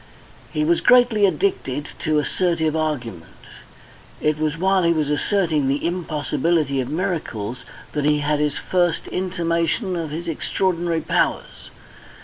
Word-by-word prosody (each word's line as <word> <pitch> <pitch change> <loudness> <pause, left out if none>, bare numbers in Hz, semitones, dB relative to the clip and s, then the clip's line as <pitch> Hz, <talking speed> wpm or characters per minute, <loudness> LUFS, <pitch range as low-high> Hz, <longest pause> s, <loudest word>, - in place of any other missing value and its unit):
He 150 - 0
was 170 +2 +2
greatly 240 -5 +5
addicted 150 -5 -1
to 155 -1 +1
assertive 160 0 0
argument. 125 - -3 0.8
It 150 0 0
was 155 0 -1
while 190 +2 +2
he 170 -1 +3
was 150 -2 0
asserting 160 -3 +1
the 140 +3 0
impossibility 155 -3 0
of 125 - -5
miracles 140 - -3 0.3
that 150 -1 -2
he 150 0 +3
had 145 0 +1
his 150 -1 0
first 175 -3 0
intimation 180 +1 -1
of 165 -3 -3
his 165 +3 -5
extraordinary 170 0 -1
powers. - - -1
160 Hz, 130 wpm, -22 LUFS, 150-175 Hz, 0.8 s, greatly